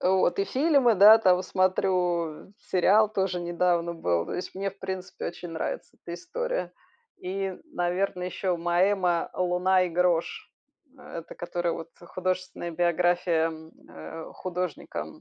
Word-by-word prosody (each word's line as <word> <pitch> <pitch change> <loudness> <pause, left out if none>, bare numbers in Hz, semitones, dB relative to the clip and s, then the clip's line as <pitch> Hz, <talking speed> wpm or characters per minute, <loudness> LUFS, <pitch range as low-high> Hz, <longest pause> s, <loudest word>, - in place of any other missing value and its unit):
Вот. 185 -1 +2
И 195 - +2
фильмы, 270 -2 +3
да, 210 +3 +9
там, 185 -4 +3
смотрю, 180 -3 0 0.2
сериал 205 +4 +4
тоже 190 -3 0
недавно 175 0 0
был. 85 - 0
То - - -5
есть 180 - -5
мне, 195 +1 -2
в 195 - -22
принципе, 190 -1 -5
очень 175 0 -7
нравится 160 -1 -5
эта 170 - -8
история. - - -3 0.5
И, 190 0 -3 0.2
наверное, 180 +1 -1
еще 180 0 -1
Моэма 175 +1 +1
"Луна 185 +1 +2
и - - -2
грош", 175 -1 0 0.5
это 170 -9 -9
которая 175 0 -2
вот 165 - -6
художественная 185 0 -3
биография, 175 -1 +2 0.4
э, 80 - -9
художника, 180 -3 -4
180 Hz, 130 wpm, -27 LUFS, 175-190 Hz, 0.5 s, да